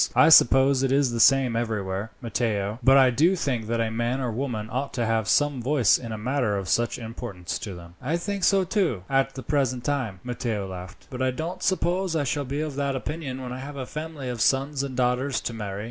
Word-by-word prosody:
I -, -, +6 dB
suppose 135 Hz, -2 st, +6 dB
it 135 Hz, -1 st, +1 dB
is 135 Hz, -2 st, +3 dB
the 120 Hz, -, -3 dB
same 130 Hz, -1 st, +5 dB
everywhere, 105 Hz, -3 st, -2 dB
Matteo, 110 Hz, -2 st, -1 dB
but 135 Hz, +3 st, +6 dB
I 130 Hz, -2 st, +6 dB
do 165 Hz, +10 st, +3 dB
think 125 Hz, -10 st, -2 dB
that 115 Hz, +1 st, -1 dB
a 115 Hz, -1 st, 0 dB
man 120 Hz, +3 st, -1 dB
or 125 Hz, -3 st, -2 dB
woman 115 Hz, -3 st, -3 dB
ought 135 Hz, +3 st, -3 dB
to 120 Hz, -2 st, 0 dB
have 110 Hz, -2 st, 0 dB
some 145 Hz, -3 st, +2 dB
voice 130 Hz, -3 st, +3 dB
in 115 Hz, -2 st, -7 dB
a 110 Hz, -, -4 dB
matter 120 Hz, -2 st, 0 dB
of 95 Hz, -1 st, -4 dB
such 120 Hz, +5 st, +1 dB
importance 115 Hz, -6 st, -6 dB
to 100 Hz, -4 st, -6 dB
them." 85 Hz, 0 st, -12 dB
"I 155 Hz, +7 st, -1 dB
think 200 Hz, +2 st, -4 dB
so, 195 Hz, -1 st, +4 dB
too, 180 Hz, -, 0 dB
at 135 Hz, 0 st, +1 dB
the 130 Hz, -, -7 dB
present 130 Hz, -4 st, 0 dB
time," 125 Hz, -9 st, -2 dB
Matteo 115 Hz, -5 st, -3 dB
laughed; 90 Hz, -1 st, -9 dB
"but 130 Hz, 0 st, -5 dB
I 130 Hz, -, +2 dB
don't 165 Hz, +8 st, -4 dB
suppose 185 Hz, -1 st, 0 dB
that 160 Hz, -, +1 dB
I -, -, 0 dB
shall 145 Hz, +1 st, -1 dB
be 140 Hz, +3 st, -3 dB
of 155 Hz, -3 st, -4 dB
that 140 Hz, -1 st, -1 dB
opinion 130 Hz, -1 st, -5 dB
when 125 Hz, -1 st, -5 dB
I 130 Hz, -, -6 dB
have 140 Hz, +2 st, -7 dB
a 130 Hz, -, -4 dB
family 155 Hz, -1 st, -6 dB
of 120 Hz, -3 st, -4 dB
sons 135 Hz, +2 st, +1 dB
and 135 Hz, -2 st, -5 dB
daughters 130 Hz, +2 st, +1 dB
to 115 Hz, -, -4 dB
marry. 100 Hz, -3 st, -5 dB
130 Hz, 235 wpm, -25 LUFS, 115-140 Hz, -, I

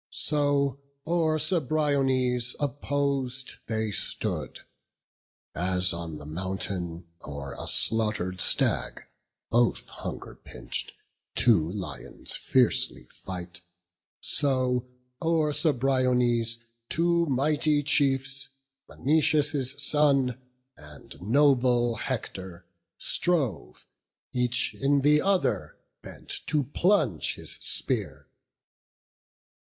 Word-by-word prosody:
So, 140 Hz, -2 st, +1 dB, 0.2 s
o'er 160 Hz, -1 st, +1 dB
Cebriones, 140 Hz, -6 st, +1 dB
oppos'd 140 Hz, -2 st, -2 dB
they 110 Hz, -1 st, -1 dB
stood; -, -, -2 dB, 0.9 s
As 90 Hz, +1 st, +1 dB
on 85 Hz, -2 st, -5 dB
the 75 Hz, -, -11 dB
mountain, 90 Hz, +1 st, -4 dB, 0.2 s
o'er 70 Hz, -1 st, -6 dB
a 85 Hz, -, -6 dB
slaughter'd 95 Hz, +2 st, +1 dB
stag, -, -, +1 dB, 0.5 s
Both 120 Hz, 0 st, +2 dB
hunger -, -, -7 dB
pinch'd, -, -, -5 dB, 0.4 s
two 95 Hz, -9 st, +3 dB
lions 90 Hz, -9 st, -5 dB
fiercely 65 Hz, -, +1 dB
fight, 90 Hz, -1 st, -7 dB, 0.6 s
So 130 Hz, -3 st, +1 dB, 0.3 s
o'er 160 Hz, -2 st, +1 dB
Cebriones 125 Hz, -5 st, +2 dB, 0.3 s
two 170 Hz, 0 st, +2 dB
mighty 145 Hz, +2 st, +2 dB
chiefs, 135 Hz, -2 st, +1 dB, 0.4 s
Menoetius' 145 Hz, -2 st, +1 dB
son 135 Hz, -4 st, +2 dB, 0.3 s
and 75 Hz, +2 st, -14 dB
noble 125 Hz, 0 st, +3 dB
Hector, 95 Hz, -7 st, -5 dB, 0.3 s
strove, 130 Hz, -, -1 dB, 0.5 s
Each 125 Hz, 0 st, +1 dB
in 140 Hz, +1 st, +2 dB
the 150 Hz, +2 st, +4 dB
other 195 Hz, -1 st, 0 dB, 0.2 s
bent -, -, -7 dB
to 150 Hz, -2 st, +1 dB
plunge 145 Hz, -, +1 dB
his -, -, -2 dB
spear. -, -, -1 dB
130 Hz, 85 wpm, -27 LUFS, 100-145 Hz, 0.9 s, the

